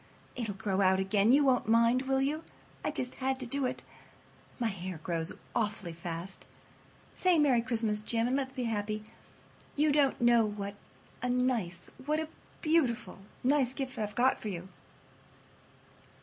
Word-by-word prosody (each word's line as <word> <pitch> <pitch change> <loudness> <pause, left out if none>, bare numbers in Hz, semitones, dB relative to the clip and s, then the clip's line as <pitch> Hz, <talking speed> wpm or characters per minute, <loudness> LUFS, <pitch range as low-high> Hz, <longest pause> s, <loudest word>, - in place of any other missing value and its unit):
It'll 220 -5 -3
grow 195 0 0
out 190 0 +4
again—you 210 +8 +4
won't 255 -4 +3
mind, 230 +2 +4
will 265 0 +2
you? 300 +4 0 0.4
I - - 0
just 250 - -1
had 265 0 0
to 255 - -4
do 270 +2 0
it. - - -5 0.7
My 240 - -1
hair 185 -3 -5
grows 165 -1 -1 0.2
awfully 210 -6 -1
fast. 170 +2 -6 0.7
Say 365 -2 +3
'Merry 275 -6 +4
Christmas!' 225 -3 0
Jim, 225 +1 +1
and 250 +2 +1
let's 270 -1 -1
be 255 -2 -3
happy. 215 -2 -2 0.7
You 300 +1 +3
don't 285 -2 +3
know 240 -1 +5
what 205 -1 -3 0.5
a 250 - -1
nice—what 250 - -1
a 315 -1 -3 0.3
beautiful, 265 - +1 0.2
nice 265 -1 +2
gift 265 -3 -4
I've 210 -1 -3
got 255 +2 +3
for 215 - -3
you." 180 -1 -6
235 Hz, 150 wpm, -31 LUFS, 205-265 Hz, 0.7 s, know